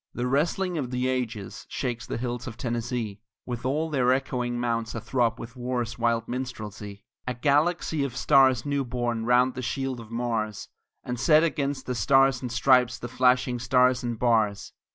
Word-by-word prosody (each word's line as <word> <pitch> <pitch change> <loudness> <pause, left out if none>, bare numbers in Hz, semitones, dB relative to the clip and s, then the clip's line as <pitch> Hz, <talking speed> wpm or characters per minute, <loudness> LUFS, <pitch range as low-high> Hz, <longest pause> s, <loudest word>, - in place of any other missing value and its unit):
The 120 - -2
wrestling 165 +6 0
of 130 -4 -3
the 125 0 -1
ages 120 -6 -3
shakes 120 -3 -3
the - - -3
hills 120 0 -4
of 115 -2 -7
Tennessee, 120 -4 -3 0.3
With 120 0 -4
all 155 +4 -1
their 130 -3 +3
echoing 125 -2 -1
mounts 115 -1 -2
a - - -2
throb 120 0 0
with 115 +2 -9
war's 120 -2 -3
wild 115 -1 +1
minstrelsy; 110 -5 -6 0.2
A 125 - -2
galaxy 150 +4 +1
of 140 - -4
stars 130 -3 +4
new 140 -1 0
born 120 -2 -2
round 125 +1 +4
the 130 - -5
shield 130 +1 -3
of 115 -2 -11
Mars, 115 -3 -3 0.3
And 125 -1 -4
set 155 +4 +5
against 140 -4 -1
the 125 - -2
Stars 135 +1 +3
and 125 -2 -4
Stripes 125 +1 +3
the 120 - -7
flashing 125 0 +2
Stars 125 +1 +3
and 120 -2 -3
Bars. 110 -4 +1
125 Hz, 175 wpm, -26 LUFS, 115-130 Hz, 0.3 s, set